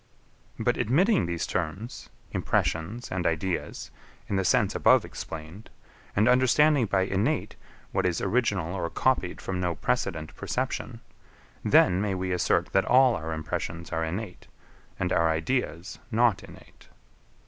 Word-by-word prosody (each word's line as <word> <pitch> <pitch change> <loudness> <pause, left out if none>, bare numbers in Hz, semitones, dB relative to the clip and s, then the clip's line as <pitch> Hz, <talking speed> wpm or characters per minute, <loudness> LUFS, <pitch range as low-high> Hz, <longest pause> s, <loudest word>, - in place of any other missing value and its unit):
But - - 0
admitting 175 - +2
these 85 -1 -2
terms, 95 +10 -4 0.2
impressions 100 +10 -1
and 90 -1 -1
ideas, 85 +2 -2 0.4
in 100 - -2
the 95 - +1
sense - - +2
above - - +4
explained, 80 +6 -8 0.5
and 105 +3 +3
understanding 130 +1 +4
by 95 -1 +2
innate, 95 +1 -1 0.4
what - - +1
is 85 -2 -1
original 100 -5 0
or 85 -3 -2
copied 130 -9 0
from 95 -1 -4
no 90 -2 -1
precedent 85 - -2
perception, - - -3 0.6
then 90 +2 +4
may 100 -2 -1
we 95 0 -3
assert 90 -1 +1
that 95 - +3
all 130 -1 +5
our 80 0 -5
impressions 85 +2 -4
are 80 -1 -1
innate, 90 +4 -5 0.5
and 90 - -1
our 85 0 +3
ideas 85 - -2
not 115 -3 +2
innate. - - -16
95 Hz, 135 wpm, -27 LUFS, 85-115 Hz, 0.6 s, all